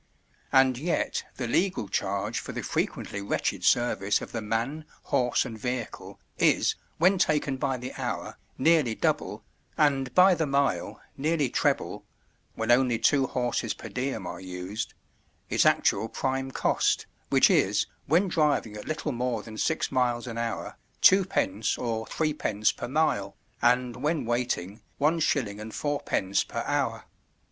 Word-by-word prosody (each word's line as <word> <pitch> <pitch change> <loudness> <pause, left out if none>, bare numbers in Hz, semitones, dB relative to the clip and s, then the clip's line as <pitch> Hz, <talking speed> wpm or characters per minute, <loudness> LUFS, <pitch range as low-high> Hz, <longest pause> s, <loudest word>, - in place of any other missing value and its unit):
And 130 -2 +4
yet 170 +4 -1
the 130 - -3
legal 180 - 0
charge 100 +4 -1
for - - -7
the - - -4
frequently 100 - -2
wretched 100 - -2
service 105 -4 +2
of - - -8
the 115 - -3
man, 115 +9 -2 0.2
horse, 125 -1 +1
and 110 -2 -7
vehicle 125 0 -5 0.2
is, - - +3 0.2
when 185 +3 +4
taken 145 -4 +1
by 135 -1 -1
the 125 +1 -7
hour, - - -4 0.2
nearly 150 -6 +3
double, - - -1 0.3
and 135 -4 +2
by 185 +1 +7
the 160 -3 0
mile, 140 -10 0 0.2
nearly 150 -2 0
treble—when 110 +1 -3
only 125 -1 +4
two 135 +4 +3
horses 120 -3 -1
per - - -9
diem 130 +2 -3
are - - -6
used—its 95 +3 -4
actual 110 - +2
prime 135 +2 -2
cost, - - +1 0.2
which - - +5
is, - - +3 0.2
when 170 +7 +3
driving 150 - +1
at 105 - -8
little 155 -1 -2
more 120 -3 -2
than 110 -1 -10
six 160 +8 0
miles 125 -2 +1
an 115 -2 -5
hour, 115 -1 -4 0.3
2d. 180 - +3
or 115 -2 -3
3d. 145 -9 0
per - - -5
mile, 120 -9 0 0.3
and 125 0 +2
when 150 +3 -1
waiting, 120 -5 -2 0.2
1s. 140 -9 0
4d. 110 -7 -1
per - - -3
hour. - - -1
125 Hz, 140 wpm, -27 LUFS, 110-145 Hz, 0.3 s, by